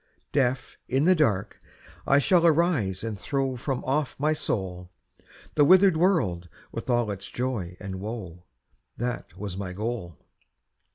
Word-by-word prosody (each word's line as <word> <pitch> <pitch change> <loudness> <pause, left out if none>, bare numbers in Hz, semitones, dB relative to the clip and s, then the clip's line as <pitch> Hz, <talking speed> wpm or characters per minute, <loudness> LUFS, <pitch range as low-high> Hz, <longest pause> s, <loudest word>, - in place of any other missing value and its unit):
Deaf, 130 -2 0
in 135 +4 +1
the 185 - +6
dark, 110 - 0 0.5
I 140 - +5
shall 170 +5 +4
arise 155 - +2
and 110 -3 -4
throw 135 +4 -1
From 130 +1 -3
off 140 +1 0
my 155 +2 +2
soul, 90 -10 -3 0.6
The 150 - +4
withered 185 +3 +6
world 135 - +1 0.2
with - - -6
all 120 -3 +2
its 100 -1 -6
joy 110 -9 -3
and 95 -2 -6
woe, 95 -5 -7 0.5
That 120 -7 -4
was 100 -2 -5
my 95 -2 -4
goal. 105 - -4
120 Hz, 140 wpm, -26 LUFS, 95-145 Hz, 0.6 s, the